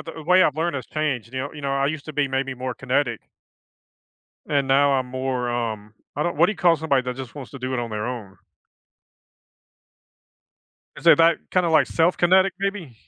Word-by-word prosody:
the 160 - -8
way 180 +4 +5
I've 150 -4 +1
learned 170 0 -1
has 130 -3 -5
changed, 135 -6 -3
you 130 - -3
know 140 - -5
you 150 - -9
know, 140 -1 -3
I 135 0 +1
used 150 0 -3
to 155 - -6
be 145 -1 +1
maybe 135 0 -2
more 130 0 -5
kinetic 130 -2 -1 1.3
and 140 -3 0
now 140 +1 +4
I'm 130 -2 0
more, 130 -1 -3
um, 110 -3 -4 0.2
I 150 - 0
don't 170 +2 -2
what 170 +4 +5
do - - 0
you - - -12
call 175 -2 +4
somebody 140 -4 +1
that 125 0 -5
just 130 -3 -8
wants 140 -4 -9
to 140 - -8
do 130 0 -4
it 130 - -1
on 120 -1 -3
their 105 0 -3
own? 115 -6 -6 2.6
Isn't - - +5
that 165 0 +5
kinda, 180 -2 +2
like, 155 -3 +4
self-kinetic 180 +3 +3
maybe? 195 - -3
140 Hz, 200 wpm, -23 LUFS, 125-160 Hz, 2.6 s, way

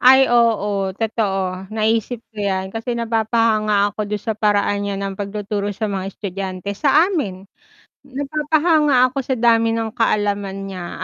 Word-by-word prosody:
Ay 265 +1 +7
oo, 205 -5 +2
totoo, 195 -3 -2
naisip 225 +2 0
ko 220 - -30
'yan 190 -2 -1
kasi 225 +4 -4
napapahanga 220 -2 +1
ako 210 +1 -4
du'n 210 0 -3
sa 220 +1 -3
paraan 205 -1 +1
niya 200 -1 -3
ng 195 -1 -4
pagtuturo 205 0 -3
sa 215 +2 -3
mga 195 -1 -4
estudyante 190 -1 -5
sa 305 - +4
amin. 200 - -3 0.6
Napapahanga 295 -1 +2
ako 275 - -3
sa 260 0 -1
dami 230 -1 +3
ng 225 -1 -2
kaalaman 200 -3 -1
niya 180 -2 -6
215 Hz, 145 wpm, -20 LUFS, 200-235 Hz, 0.6 s, Ay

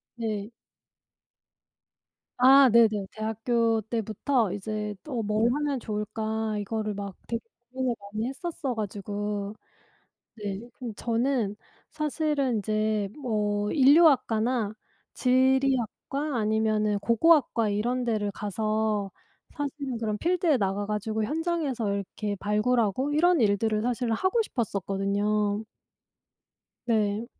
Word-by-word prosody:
네. 215 -3 -3 1.9
아 265 +1 +7
네네. 215 -4 +4
대학교 225 +1 0
때부터 220 +1 -1
이제 210 +1 -4 0.3
'뭘 215 +3 +2
하면 290 -1 -1
좋을까?' 220 0 -3
이거를 215 +1 -2
막 200 -2 -6
되게 230 0 -2 0.3
고민을 255 -2 -1 0.2
많이 215 +2 -1
했었어 280 -2 -4
가지고 205 0 -4 0.8
네 205 -2 -5
근데 245 -3 -7
저는 235 -2 0 0.4
사실은 300 -4 0
인제 215 0 0
뭐 210 -4 0
인류학과나 255 -7 +4 0.4
지리학과 265 +2 +1
아니면은 215 -1 +1
고고학과 235 -1 +3
이런 240 +5 0
데를 215 -4 -1
가서 215 0 -1 0.4
사실은 280 -3 -4
그런 215 -2 -2
필드에 340 - +2
나가 200 -1 -1
가지고 215 +1 -2
현장에서 295 - -1
이렇게 200 +1 -3
발굴하고 220 +4 +1
이런 340 0 +4
일들을 215 0 +2
사실은 240 0 0
하고 375 - +1
싶었었거든요. 205 - -1 1.2
네. 215 -1 +1
220 Hz, 240 characters per minute, -27 LUFS, 210-255 Hz, 1.9 s, 아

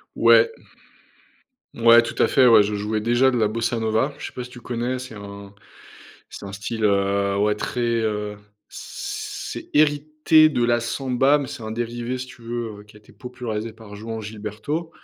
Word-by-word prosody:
Ouais. 465 - +6 1.3
Ouais, 115 0 +7
tout 115 - -6
à - - +4
fait, 130 -2 +5
ouais, 110 -3 +7
je 105 +1 -2
jouais 105 +1 -2
déjà 120 +4 +3
de 125 - -1
la 110 - +3
bossa 115 +2 -1
nova. 110 +5 +1
Je - - -7
sais - - -7
pas 125 - -5
si 125 - -10
tu 125 - -12
connais, 120 +1 -3
c'est 125 -2 -8
un 100 -1 -10 0.8
c'est - - -9
un 100 - -7
style, 110 +3 -5
heu, 100 -1 +1
ouais 105 +1 +2
très, 115 +3 -4
heu, 110 -3 -1 0.3
c'est - - -7
hérité 155 +1 +4
de 125 -6 0
la 120 0 +2
samba, 135 +4 +1
mais 140 - -4
c'est 115 - -8
un 110 - -5
dérivé, 120 +2 -3
si 130 - -6
tu 130 -2 -15
veux, 115 -2 -5
heu, - - -12
qui 105 0 -19
a - - -13
été 105 - -21
popularisé 115 -3 -6
par 110 -2 -13
Joao 110 +2 -6
Gilberto, 110 +10 -5
115 Hz, 190 wpm, -23 LUFS, 105-125 Hz, 1.3 s, Ouais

